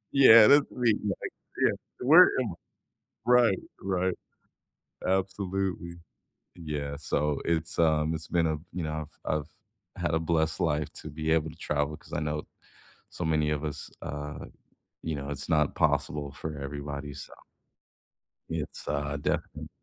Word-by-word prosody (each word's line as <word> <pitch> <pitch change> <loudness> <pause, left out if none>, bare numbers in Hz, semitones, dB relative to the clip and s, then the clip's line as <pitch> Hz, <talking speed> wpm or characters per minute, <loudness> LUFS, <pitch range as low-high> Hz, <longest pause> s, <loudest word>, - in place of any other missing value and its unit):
Yeah. 115 -5 +10
That's 145 +3 +6
me, 120 -3 +2
like, 100 -2 -3 0.3
yeah, - - +5 0.3
where 160 +8 +8
am 120 - -2
I? - - -11 0.7
Right, 120 -5 +5 0.2
right. 95 -1 0 0.9
Absolutely. 95 -2 -1 0.6
Yeah. 75 -3 -4
So, 75 -1 -1
it's, 85 0 -1
um, 80 -1 +3
it's 80 0 -5
been 85 -2 +2
a 80 - -1
you 90 -1 -3
know, 75 -1 -3 0.2
I've - - +1
I've 75 - -12 0.6
had 80 - +1
a 80 - +3
blessed 80 -1 +1
life 75 -1 0
to - - -8
be 80 +1 -3
able 80 -1 +2
to - - -14
travel 75 +1 -1
'cause - - -18
I - - -1
know 75 0 -2 0.6
so 90 - -5
many 75 -1 +2
of 75 0 -1
us 75 -1 -5
uh, 75 0 -5 0.6
you 80 -2 -2
know, 70 0 -5
it's 75 - -5
not 75 -3 +2
possible 75 -1 +1
for 75 +1 -6
everybody, 70 0 -5
so - - -9 1.2
it's, 80 -3 -5
uh, 70 0 -1
definite - - -2
80 Hz, 150 wpm, -28 LUFS, 75-90 Hz, 1.2 s, Yeah